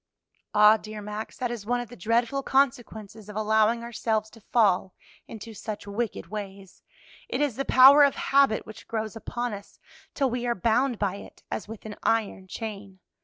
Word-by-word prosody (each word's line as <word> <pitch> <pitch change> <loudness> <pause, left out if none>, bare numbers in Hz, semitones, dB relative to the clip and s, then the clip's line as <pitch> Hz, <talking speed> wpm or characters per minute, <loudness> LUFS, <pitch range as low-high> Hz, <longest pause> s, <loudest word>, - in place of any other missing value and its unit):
"Ah, 210 +1 +7
dear 215 0 -9
Max, 210 +1 -7
that 245 -1 -2
is 235 -4 -5
one 245 +3 0
of 245 -2 -6
the 245 - -11
dreadful 235 +7 0
consequences 225 -6 -1
of 210 - -9
allowing 220 +2 +2
ourselves 220 -2 -2
to 225 - -16
fall 195 -5 +2 0.3
into 225 +1 -9
such 210 0 -7
wicked 205 -2 -3
ways; 195 0 -8 0.5
it - - -2
is 290 -6 0
the 275 +2 -3
power 275 +3 +8
of 280 - +3
habit 275 -5 +2
which 215 0 -12
grows 220 -1 -3
upon 240 +1 -4
us 200 0 -10 0.4
till 270 -3 +1
we 245 0 -2
are 240 - +1
bound 235 +4 +1
by 200 -2 -1
it - - -13
as - - -4
with 220 0 -10
an 210 -1 -7
iron 210 -4 0
chain. 200 -2 -7
220 Hz, 180 wpm, -26 LUFS, 210-240 Hz, 0.5 s, power